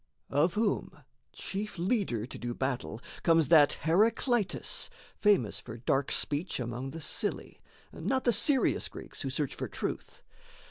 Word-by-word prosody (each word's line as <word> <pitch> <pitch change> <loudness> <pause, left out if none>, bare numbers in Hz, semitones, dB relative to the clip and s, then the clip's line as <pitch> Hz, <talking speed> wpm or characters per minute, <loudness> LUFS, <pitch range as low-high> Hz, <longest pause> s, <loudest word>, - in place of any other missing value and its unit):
Of 165 +5 +2
whom, 215 -1 -1 0.3
chief 205 +1 -5
leader 175 - 0
to 130 - -9
do 120 0 -4
battle, 130 -4 -3 0.2
comes 165 -4 +3
That 150 -4 +7
Heraclitus, 215 - +2 0.3
famous 195 - +2
for 115 -1 -9
dark 135 +3 0
speech 150 +3 +1
Among 120 +2 -4
the 160 +4 -8
silly, 155 - -3 0.3
not 260 -1 -1
the 240 - +3
serious 275 +3 +3
Greeks - - -9
Who - - -2
search - - -2
for - - -4
truth. - - -5
165 Hz, 140 wpm, -30 LUFS, 130-210 Hz, 0.3 s, That